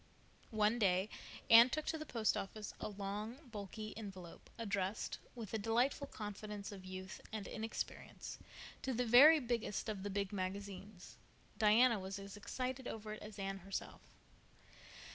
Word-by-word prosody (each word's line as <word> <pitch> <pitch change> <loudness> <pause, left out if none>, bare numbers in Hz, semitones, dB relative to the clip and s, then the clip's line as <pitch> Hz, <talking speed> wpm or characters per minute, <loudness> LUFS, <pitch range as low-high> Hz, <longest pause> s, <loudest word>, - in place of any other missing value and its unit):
One 215 +1 +2
day 190 -1 +3 0.4
Anne 230 +2 +10
took 310 +3 -2
to 320 - -1
the 310 - -6
Post 225 -3 +2
Office 210 +2 -4
a - - -3
long, 205 +3 -4
bulky 215 +1 -6
envelope, 190 -6 -8
addressed, 200 -3 -1 0.2
with 225 -5 -6
the 220 - -1
delightful 240 +6 +2
confidence 210 -3 -6
of 195 -2 -8
youth 185 +1 -7
and 215 -2 -4
inexperience, 225 0 -5 0.4
to 265 - -1
the 250 +1 +1
very 280 +7 +9
biggest 235 -4 -1
of 205 -3 -3
the 205 - -3
"big" 200 0 -1
magazines. 195 0 -5 0.4
Diana 225 +1 +6
was 190 +1 -4
as 200 0 -8
excited 255 +4 -3
over 215 -1 -5
it 215 - -8
as 210 0 -9
Anne 195 0 -3
herself. 195 +1 -5
210 Hz, 150 wpm, -38 LUFS, 195-230 Hz, 0.4 s, Anne